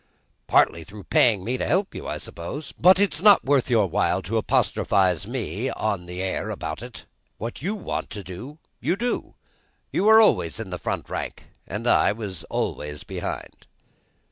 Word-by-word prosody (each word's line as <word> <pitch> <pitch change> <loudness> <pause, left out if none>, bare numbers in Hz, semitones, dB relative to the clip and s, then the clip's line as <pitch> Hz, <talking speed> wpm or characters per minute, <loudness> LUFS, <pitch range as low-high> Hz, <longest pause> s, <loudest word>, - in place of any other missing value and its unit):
"Partly 85 - +3
through 100 +5 -11
paying 105 -3 +3
me 125 +4 -2
to - - -1
help 190 +5 +1
you, - - -7
I - - -3
suppose. 140 - -7
But 185 +2 +5
it's 200 -6 +1
not 205 -1 +7
worth 135 -2 +2
your 115 -4 +4
while 95 +1 0
to 110 +7 -1
apostrophise 95 -4 +1
me, 120 - -3
or 105 -3 -1
the 90 +1 -6
air, 95 - -2
about - - -5
it; - - -9 0.3
what 115 +4 -6
you 195 +8 -1
want 205 - -4
to 105 - -7
do, 115 - -9 0.2
you 175 - 0
do. 240 +4 -3 0.6
You 195 - 0
were 220 +1 +8
always 115 - +3
in 105 -4 -6
the 90 - -4
front - - -3
rank, - - -5 0.2
and 105 +6 -5
I 120 - +4
was 100 -7 -6
always 75 0 -3
behind." - - -6
110 Hz, 175 wpm, -24 LUFS, 95-150 Hz, 0.6 s, were